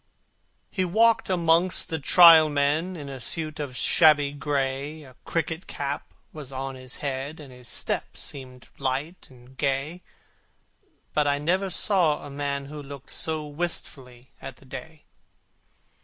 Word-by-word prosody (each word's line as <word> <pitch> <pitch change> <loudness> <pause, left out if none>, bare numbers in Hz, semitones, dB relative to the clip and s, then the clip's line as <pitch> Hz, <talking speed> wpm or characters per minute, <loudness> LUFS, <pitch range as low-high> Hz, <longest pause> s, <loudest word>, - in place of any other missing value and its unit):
He 190 - 0
walked 225 +5 +3
amongst 175 0 +2
the 160 - -2
Trial 165 +1 +8
Men 150 +5 0
In 145 -4 -8
a 135 -1 -7
suit 155 +4 -1
of 135 -4 -5
shabby 150 -4 +4
gray; 145 +1 -3
A 130 -3 -15
cricket 165 +1 -3
cap 140 0 -5 0.2
was 145 -4 -8
on 135 0 -4
his 130 -1 -5
head, 140 +3 -4
And 140 -4 -11
his 125 -1 -13
step - - -3
seemed 130 -2 -7
light 140 +6 -3
and 125 0 -18
gay; 140 +5 -2 1.1
But 150 -1 +2
I 145 0 +2
never 185 +6 0
saw 175 -5 +2
a 145 - -9
man 140 0 -3
who 150 +1 -8
looked 140 -1 -11
So 155 -1 -1
wistfully 135 -5 -5
at 135 - -8
the 135 - -20
day. 155 +4 -10
145 Hz, 145 wpm, -25 LUFS, 135-160 Hz, 1.1 s, Trial